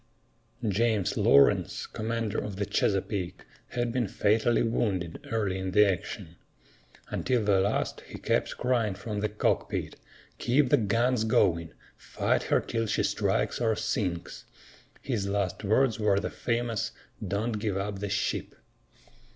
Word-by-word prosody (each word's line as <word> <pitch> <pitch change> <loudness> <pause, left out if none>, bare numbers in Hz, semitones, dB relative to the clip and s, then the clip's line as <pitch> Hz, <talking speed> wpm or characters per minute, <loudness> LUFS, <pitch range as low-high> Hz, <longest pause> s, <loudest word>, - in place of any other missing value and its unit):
James 105 -1 +1
Lawrence, 70 - +4
commander 115 -1 -2
of 105 -2 -5
the 100 +1 -1
Chesapeake, 100 -2 -1 0.2
had 120 -1 -2
been 120 -2 0
fatally 110 +4 +2
wounded 95 -7 -1
early 100 -4 0
in 95 0 -3
the 105 +1 +7
action. 90 -2 -3 0.7
Until 125 -3 0
the 100 -2 +4
last, 100 +2 0
he - - -8
kept - - -1
crying 120 -5 +1
from 105 +1 -4
the 105 +1 0
cockpit, 105 - -1 0.4
"Keep 130 +2 +3
the - - +5
guns 115 +2 +1
going! 85 -7 +2 0.2
Fight - - 0
her - - +4
till 115 -1 -2
she 105 - +1
strikes - - 0
or 110 -2 +2
sinks!" 100 -5 -3 0.6
His 105 -7 -1
last 100 0 -1
words 110 +3 +2
were 105 -2 +3
the - - -4
famous, 115 -1 -2 0.3
"Don't 105 +3 -1
give 105 -3 -1
up 100 0 -3
the 100 0 -3
ship!" 95 0 -2
105 Hz, 140 wpm, -28 LUFS, 100-115 Hz, 0.7 s, the